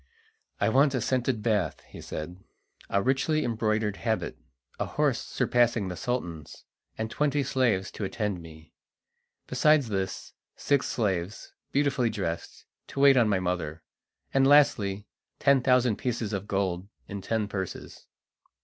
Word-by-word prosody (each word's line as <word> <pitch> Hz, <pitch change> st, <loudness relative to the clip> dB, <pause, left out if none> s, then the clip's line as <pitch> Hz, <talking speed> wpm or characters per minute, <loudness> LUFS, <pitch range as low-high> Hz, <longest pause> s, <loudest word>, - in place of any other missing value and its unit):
"I -, -, +2 dB
want 140 Hz, +1 st, +4 dB
a -, -, +1 dB
scented 125 Hz, -1 st, 0 dB
bath," 105 Hz, -9 st, 0 dB
he -, -, -11 dB
said, 90 Hz, +5 st, -7 dB, 0.5 s
"a 100 Hz, 0 st, +1 dB
richly 135 Hz, +4 st, +1 dB
embroidered 110 Hz, -2 st, 0 dB
habit, 110 Hz, -2 st, -2 dB, 0.4 s
a -, -, 0 dB
horse -, -, +1 dB
surpassing 120 Hz, -5 st, +1 dB
the 90 Hz, -, -4 dB
Sultan's, 85 Hz, -, -4 dB, 0.3 s
and 110 Hz, 0 st, -3 dB
twenty 145 Hz, -1 st, +1 dB
slaves 120 Hz, -7 st, +1 dB
to -, -, -6 dB
attend 100 Hz, -2 st, -2 dB
me. 80 Hz, -1 st, -14 dB, 0.7 s
Besides 150 Hz, -5 st, +3 dB
this, 95 Hz, -2 st, -3 dB, 0.2 s
six 140 Hz, -2 st, +1 dB
slaves, 95 Hz, -3 st, -2 dB, 0.2 s
beautifully 135 Hz, -4 st, +2 dB
dressed, 95 Hz, -6 st, -4 dB, 0.2 s
to -, -, -6 dB
wait 140 Hz, -1 st, +7 dB
on 120 Hz, -4 st, +4 dB
my 100 Hz, -2 st, +2 dB
mother; 85 Hz, -4 st, -3 dB, 0.5 s
and 135 Hz, 0 st, +4 dB
lastly, 105 Hz, -9 st, +4 dB, 0.3 s
ten 140 Hz, -2 st, +4 dB
thousand 125 Hz, -3 st, +3 dB
pieces 115 Hz, -4 st, -2 dB
of 100 Hz, 0 st, -3 dB
gold 95 Hz, -2 st, -1 dB, 0.2 s
in 100 Hz, -1 st, -6 dB
ten 110 Hz, +1 st, -1 dB
purses." 95 Hz, -3 st, -6 dB
110 Hz, 140 wpm, -28 LUFS, 95-130 Hz, 0.7 s, wait